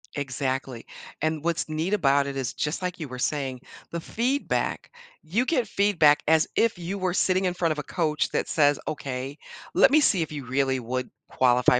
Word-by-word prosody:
Exactly, 130 -3 -3 0.4
and 155 -1 -1
what's 170 0 -1
neat 160 +5 -1
about 140 -7 +3
it 140 - -4
is, 130 -3 -2
just 150 +4 -2
like, 180 0 -3
you 155 - -4
were 125 -1 -8
saying, 135 -2 -2 0.3
the 170 - -3
feedback, 250 - -1 0.3
you 210 +11 0
get 255 -6 +1
feedback 165 -8 +3
as 160 0 +4
if 230 -4 +2
you 175 +4 -4
were 185 -2 -1
sitting 185 0 +2
in 180 - +1
front 175 -2 0
of 155 - -2
a - - -3
coach 155 -3 0
that - - -1
says, 145 -2 +3
"Okay, 135 -1 -4 0.4
let - - +7
me 305 - +6
see 200 - +3
if 155 - -8
you 145 -3 -6
really 130 +1 +1
would 125 +1 -3 0.2
qualify 125 0 +4
155 Hz, 195 wpm, -26 LUFS, 135-180 Hz, 0.4 s, let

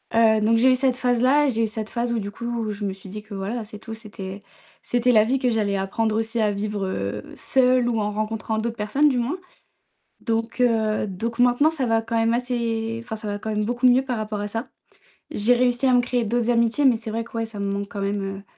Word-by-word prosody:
heu, 220 -1 +5
donc 225 +2 +3
j'ai 260 +3 +5
eu - - +5
cette 255 -1 +1
phase-là 255 +4 +3
et - - +2
j'ai 225 0 +1
eu - - -2
cette 215 0 -5
phase 240 0 -2
où 235 - 0
du 205 -1 -4
coup 235 -1 -3
je 205 0 -6
me 195 -2 -1
suis 195 0 -12
dit 210 +2 -6
que, 210 -1 -10
voilà, 215 +4 -3
c'est 210 - -10
tout, 225 0 -8
c'était 205 -3 -8 0.4
c'était 245 +1 +1
la 215 -3 +6
vie, 260 +4 +1
que 250 -2 +1
j'allais 205 -3 0
apprendre 215 +3 -1
aussi 225 +1 -2
à 210 - +3
vivre, 205 -1 -2
heu, 105 - -3
seule 255 -2 +3
ou 230 -2 0
en 210 - 0
rencontrant 215 +1 -2
d'autres 230 +1 -2
personnes 270 +8 +2
du 255 - 0
moins, 265 +10 -1 0.8
donc 230 +1 -2
heu, 220 -3 +2
donc 230 +5 -4
maintenant, 250 +6 +4
ça 275 -6 -1
va 225 -1 +2
quand 230 0 -2
même 225 +1 +2
assez 230 -2 -1
enfin, 220 -1 -6
ça 215 0 -7
va 205 - -3
quand 220 - -5
même 210 0 0
beaucoup 245 +3 +2
mieux 250 +2 +5
par 255 -3 -3
rapport 215 -1 -3
à 205 - -3
ça. 225 +4 -3 0.7
J'ai 215 +4 +3
réussi 245 +1 +2
à 255 - +4
me 245 - +5
créer 245 -1 -1
d'autres 235 +2 0
amitiés 235 +3 +2
mais 255 -4 +5
c'est 220 -1 -7
vrai 230 +1 -2
que, 235 - -16
ouais, 225 - 0
ça 220 -2 -10
me 200 0 -1
manque 200 0 -3
quand 200 - -5
même, 200 0 -1
heu, 195 0 -5
225 Hz, 255 wpm, -23 LUFS, 210-245 Hz, 0.8 s, la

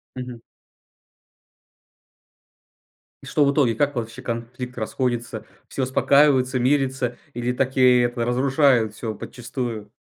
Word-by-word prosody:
Мгм. 125 -2 -7 2.8
И - - -14
что 150 - +1
в 140 - +3
итоге 135 -6 +2
как 145 +4 0
вообще 115 +1 -5
конфликт 125 +1 -6
расходится 120 -1 -3 0.2
все 135 - -3
успокаиваются 130 0 +3
мирятся 130 -1 0 0.2
или 120 +1 -2
так 130 +1 -1
и 125 -1 +5
это 120 0 0
разрушает 130 -2 +2
всё 110 -1 -4
подчистую. 115 -2 -6
125 Hz, 115 wpm, -23 LUFS, 120-130 Hz, 2.8 s, и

